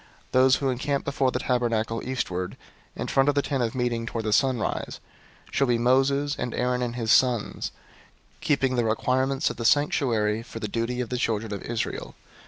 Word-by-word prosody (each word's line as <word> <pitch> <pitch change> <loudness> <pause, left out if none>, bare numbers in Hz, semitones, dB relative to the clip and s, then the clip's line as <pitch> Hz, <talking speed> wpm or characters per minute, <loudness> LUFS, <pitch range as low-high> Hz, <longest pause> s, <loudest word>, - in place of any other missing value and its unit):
003:038 - - -26 0.2
Those 130 +1 +5
who 135 - -1
encamp 140 +3 -2
before 140 -2 +1
the - - -1
tabernacle 115 -2 0
eastward, 95 -8 -3 0.4
in - - -3
front 135 +1 +3
of 145 - +1
the 140 - +2
Tent 135 -3 -1
of 115 0 -1
Meeting 120 -2 -1
toward 115 -1 -3
the 105 - +1
sunrise, 130 -2 0 0.5
shall 135 - +2
be 120 -1 +3
Moses, 135 +4 +2
and 125 - -3
Aaron 125 0 0
and 120 -1 -2
his 115 -2 0
sons, 125 -5 +2 0.7
keeping 135 -3 +1
the 115 -2 +2
charge 130 +1 +1
of - - -9
the 115 - -4
sanctuary 115 -6 +2
for 115 - -9
the 110 - -3
charge 115 +3 -2
of 120 - -4
the 125 - -2
children 110 -3 -1
of 100 - -5
Israel. 115 -1 -4
125 Hz, 190 wpm, -26 LUFS, 115-135 Hz, 0.7 s, Those